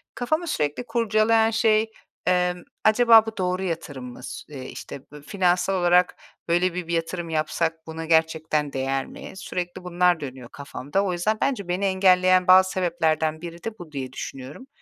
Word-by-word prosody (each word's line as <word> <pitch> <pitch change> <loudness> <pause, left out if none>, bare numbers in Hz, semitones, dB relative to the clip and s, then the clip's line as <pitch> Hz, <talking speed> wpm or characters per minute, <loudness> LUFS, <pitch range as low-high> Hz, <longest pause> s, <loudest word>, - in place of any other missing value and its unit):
kafamı 310 +8 -1
sürekli 150 - -2
kurcalayan 225 -1 +2
şey: 220 0 +2 0.4
Emm, 180 -1 +1 0.2
acaba 225 0 +6
bu 225 -1 -7
doğru 185 0 -1
yatırım 155 -7 -5
mı? 125 - -13
Su - - -8
eee, 130 -2 -7
işte, 140 - -8
bö 150 -1 -11
finansal 180 +3 +1
olarak 180 0 +3 0.3
böyle 175 +1 +2
bi 180 -2 -5
bir 170 - -3
yatırım 170 +1 -2
yapsak 160 +1 -2
buna 160 0 -6
gerçekten 160 -2 +1
değer 135 0 -1
mi? - - -10
Sürekli 180 -1 -5
bunlar 180 -1 +2
dönüyor 130 -4 -8
kafamda. 145 +5 -3
O 190 -2 -1
yüzden 210 +5 0
bence 250 -9 -1
beni 180 +3 -1
engelleyen 185 -1 +4
bazı 185 0 +7
sebeplerden 160 -3 0
biri 170 0 -9
de 225 -1 -6
bu 170 -3 -10
diye 130 -3 -6
düşünüyorum. 135 - -8
175 Hz, 165 wpm, -24 LUFS, 160-195 Hz, 0.4 s, bazı